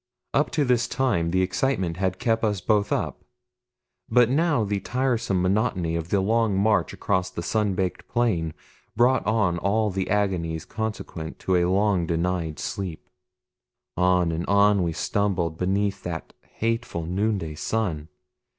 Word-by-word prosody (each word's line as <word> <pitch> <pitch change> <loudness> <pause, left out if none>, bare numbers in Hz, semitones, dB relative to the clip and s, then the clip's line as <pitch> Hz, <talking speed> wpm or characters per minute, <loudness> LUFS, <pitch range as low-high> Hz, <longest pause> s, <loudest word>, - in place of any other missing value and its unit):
Up 150 - +2
to 150 -3 +2
this 120 -1 +2
time 120 -11 0
the 95 +2 +2
excitement 95 -2 0
had 95 -1 -1
kept 115 -1 0
us 105 -3 +1
both 105 +1 +1
up; - - -2 0.9
but 125 -1 +4
now 150 -4 +2
the 100 -1 -1
tiresome 120 -3 0
monotony 90 -4 +1
of 85 0 -3
the 100 0 +2
long 110 0 +2
march 105 +2 +2
across 95 -2 -1
the 85 -2 -6
sun 105 -2 0
baked 90 -1 -2
plain 90 -10 0 0.4
brought 125 +3 +3
on 105 -6 +2
all 105 +3 +1
the 95 0 -2
agonies 90 -6 0
consequent 105 -7 -5
to 95 - 0
a 90 -1 +3
long 95 -3 +2
denied 85 -2 -1
sleep. 90 -5 -5 0.8
On 90 -1 +3
and 80 +2 -3
on 100 0 +4
we 85 -2 0
stumbled 85 -3 -1
beneath 100 +2 0
that 85 -2 -6 0.2
hateful 115 -7 -2
noonday 95 -2 -1
sun. 80 -3 -2
95 Hz, 150 wpm, -25 LUFS, 85-110 Hz, 0.9 s, but